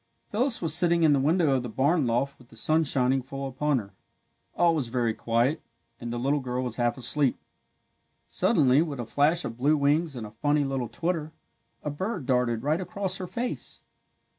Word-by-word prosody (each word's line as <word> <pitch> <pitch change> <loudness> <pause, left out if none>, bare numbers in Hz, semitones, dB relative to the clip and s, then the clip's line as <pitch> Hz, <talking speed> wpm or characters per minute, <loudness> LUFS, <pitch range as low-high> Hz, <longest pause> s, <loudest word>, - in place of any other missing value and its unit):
Phyllis 235 0 +1
was 160 -2 0
sitting 170 0 +3
in 155 -2 +5
the 140 - +3
window 155 +2 +2
of 130 - 0
the 125 - -6
barn 140 +4 +1
loft 130 +4 -1
with 125 -1 -19
the - - -16
sun 155 +8 +2
shining 135 -1 +1
full 135 +1 -6
upon 140 +2 0
her. 100 -5 -6 0.6
All 170 -1 +4
was 145 -6 -1
very 120 -1 0
quiet 120 +8 0 0.4
and 120 0 -5
the 120 - -3
little 140 +4 +1
girl 125 -1 -3
was 120 -2 -5
half 120 0 0
asleep. 135 +1 +1 0.9
Suddenly, 130 +2 +3
with 150 -5 -3
a 120 - -3
flash 150 +8 +2
of 115 - -6
blue 150 +4 +3
wings 150 +2 +1
and 115 -3 -5
a 105 - -10
funny 145 +6 +1
little 135 -4 -2
twitter, 165 -2 -3 0.5
a 150 - -2
bird 185 - -4
darted 125 -3 +1
right 155 +5 +1
across 195 -1 -3
her 185 - -5
face. 245 +6 -5
140 Hz, 195 wpm, -27 LUFS, 125-160 Hz, 0.9 s, in